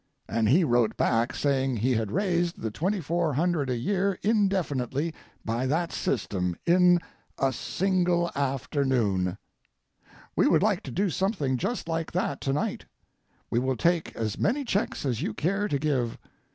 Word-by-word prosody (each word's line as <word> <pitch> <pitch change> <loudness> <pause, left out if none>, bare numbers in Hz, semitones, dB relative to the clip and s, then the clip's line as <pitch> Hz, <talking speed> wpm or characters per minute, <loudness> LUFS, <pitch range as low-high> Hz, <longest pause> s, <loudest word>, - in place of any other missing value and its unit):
And 110 -1 +1
he 175 +9 +5
wrote 120 -6 +2
back 115 +2 +1
saying 135 -3 +1
he 125 +5 +1
had 110 -3 -1
raised 175 -2 0
the 110 - -3
$2400 170 - 0
a 125 - +1
year 195 - 0
indefinitely 170 - 0 0.3
by 115 +3 -1
that 165 +5 0
system 95 -7 -1
in 180 0 +5 0.4
a 135 -1 +1
single 180 +2 0
afternoon. 130 - 0 1.0
We - - +4
would 165 +2 +4
like 205 -3 +2
to - - -6
do 195 0 0
something 180 - 0
just 225 - -2
like 165 -1 -2
that 170 -6 -1
to 135 - -1
night. 145 - -2 0.7
We 120 - +2
will 130 0 0
take 170 -1 +1
as 110 -2 -3
many 275 +6 +1
checks 205 -8 -1
as 120 -5 -1
you 110 - -2
care 195 +5 0
to 145 - 0
give. 135 -5 -1
150 Hz, 150 wpm, -27 LUFS, 125-180 Hz, 1.0 s, he